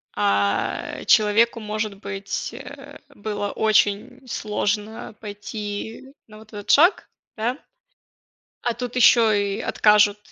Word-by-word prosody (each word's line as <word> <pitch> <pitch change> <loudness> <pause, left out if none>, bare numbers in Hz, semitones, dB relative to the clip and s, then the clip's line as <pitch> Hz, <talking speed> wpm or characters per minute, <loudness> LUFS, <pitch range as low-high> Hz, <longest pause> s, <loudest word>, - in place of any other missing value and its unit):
А, 100 -1 0
человеку, 220 +2 +4
может 215 -1 -3
быть, 195 -1 -5
э, - - -11
было 205 -1 -4
очень 220 +4 +1
сложно 215 0 -3
пойти 210 +4 -7
на 215 -1 -14
вот 220 0 -16
этот 205 -1 -9
шаг, 340 +7 +4 0.3
да. 235 +4 -1 1.1
А 240 - -1
тут 245 +1 -6
ещё 235 -2 +6
и 200 0 0
откажут, 210 -2 +3
215 Hz, 110 wpm, -23 LUFS, 205-230 Hz, 1.1 s, ещё